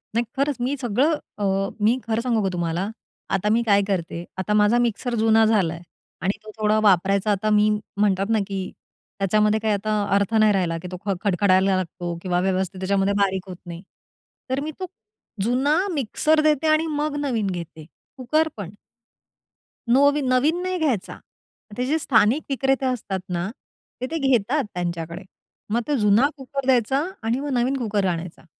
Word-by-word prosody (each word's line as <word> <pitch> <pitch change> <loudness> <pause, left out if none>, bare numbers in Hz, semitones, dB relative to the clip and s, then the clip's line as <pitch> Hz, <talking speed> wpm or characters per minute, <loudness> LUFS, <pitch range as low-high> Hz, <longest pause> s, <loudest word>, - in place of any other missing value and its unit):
नाही 235 +1 +2
खरंच! 280 0 +1
मी 275 +3 0
सगळं 255 +7 +2 0.2
अ, 205 - -3 0.4
मी 240 +4 +4
खरं 225 +1 0
सांगू 230 -4 0
का 190 - +1
तुम्हाला 175 +3 -2 0.5
आता 205 +2 0
मी 230 +2 +3
काय 200 -2 +4
करते. 170 -3 -2
आता 200 +3 -1
माझा 210 +3 +4
मिक्सर 240 +1 -1
जुना 225 0 +5
झालाय 175 -7 +1 0.4
आणि 190 +3 -1
तो 215 - -10
थोडा 215 0 +2
वापरायचा 195 +1 +3
आता 205 +2 0
मी 210 0 +4 0.3
म्हणतात 200 0 +1
ना, 225 - +3
की 195 -2 -4 0.5
त्याच्यामध्ये 210 +2 +2
काही 215 -1 0
आता 210 +1 0
अर्थ 200 +2 +1
नाही 215 -1 +5
राहिला, 175 -3 0
की 175 +2 -8
तो 180 - -5
ख 200 - +1
खडखडायला 190 0 +3
लागतो 175 -1 -4
किंवा 180 -1 0
व्यवस्थित 190 0 -1
त्याच्यामध्ये 195 +1 +1
बारीक 190 -1 0
होत 180 - -6
नाही, 170 0 -8 0.7
तर 260 +1 0
मी 310 - -4
तो 370 - -3 0.6
जुना 265 +7 +2 0.2
मिक्सर 305 +4 +1
देते, 305 0 +2
आणि 310 +1 +3
मग 300 -1 -1
नवीन 225 -7 0
घेते. 170 -4 -6 0.3
कुकर 305 +6 +1
पण. 190 -4 -6 1.2
नोवीन 285 +1 +4
नवीन 310 +8 +2
नाही 370 0 -2
घ्यायचा, 260 -12 -1 0.6
ते 250 - 0
जे 305 +4 +1
स्थानिक 245 +2 +3
विक्रेते 270 0 +1
असतात 215 -7 -2
ना, 175 +2 -2 0.5
तर 255 - -1
ते 325 - -1
घेतात 260 +3 +2
त्यांच्याकडे. 170 0 -4 0.5
मग 235 - +2
ते 295 - +1
जुना 215 +6 +4
कुकर 275 0 -5
द्यायचा 265 +2 +2 0.2
आणि 230 +3 0
मग 290 +1 -4
नवीन 255 +3 +1
कुकर 210 -5 -1
आणायचा. 170 -1 -4
215 Hz, 170 wpm, -23 LUFS, 190-260 Hz, 1.2 s, जुना